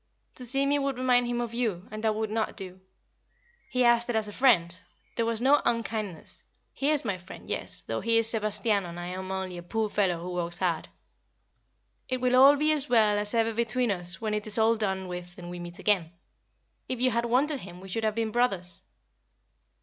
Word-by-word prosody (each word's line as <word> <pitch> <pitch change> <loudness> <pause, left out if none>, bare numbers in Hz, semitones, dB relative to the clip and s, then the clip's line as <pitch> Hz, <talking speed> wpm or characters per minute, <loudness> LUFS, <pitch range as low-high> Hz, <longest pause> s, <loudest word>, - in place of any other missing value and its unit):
To 250 - 0
see 270 +3 +3
me 285 +1 +2
would 275 -2 -2
remind 250 -1 +2
him 240 0 -2
of 235 -1 -4
you, 220 -7 -2
and 215 0 -7
that 220 -1 +1
would 220 0 -3
not 220 0 -2
do. 185 -2 -2 0.9
He 250 0 +1
asked 240 0 +3
it 240 - -1
as 220 -1 0
a - - -7
friend 185 -9 +2 0.3
there 230 -1 0
was 230 -1 -1
no 275 +4 +4
unkind 220 -4 -1
ness 160 - -11 0.3
he 275 - 0
is 300 -3 +2
my 195 -4 -2
friend, 180 +2 -12
yes, - - +1
though - - -3
he 230 0 +3
is 230 -1 +4
Sebastiano 210 -3 0
and 170 +1 -8
I 175 0 -5
am 185 +1 -6
only 190 -2 -4
a - - -8
poor 215 +5 -2
fellow 190 -5 0
who 180 +1 -6
works 175 -1 -3
hard. 175 -3 -1 1.2
It 255 0 -1
will 250 0 +2
all 275 +3 +8
be 305 +2 +2
as 295 -2 0
well 215 -3 +4
as 210 +2 -3
ever 225 0 +2
between 235 +1 0
us 175 -1 +2
when 215 -2 -2
it 210 0 -2
is 210 - +1
all 225 +1 +4
done 190 -3 -2
with 180 0 -8
and 175 -1 -8
we 175 - -7
meet 175 0 -8
again. 185 -6 +1 0.8
If 255 - -3
you 255 +1 +3
had 235 +1 0
wanted 270 +5 +1
him 180 -4 -11
we 190 - -11
should 225 +4 -3
have 215 -1 0
been 225 -1 -1
brothers." 195 -7 0
220 Hz, 220 wpm, -27 LUFS, 185-240 Hz, 1.2 s, all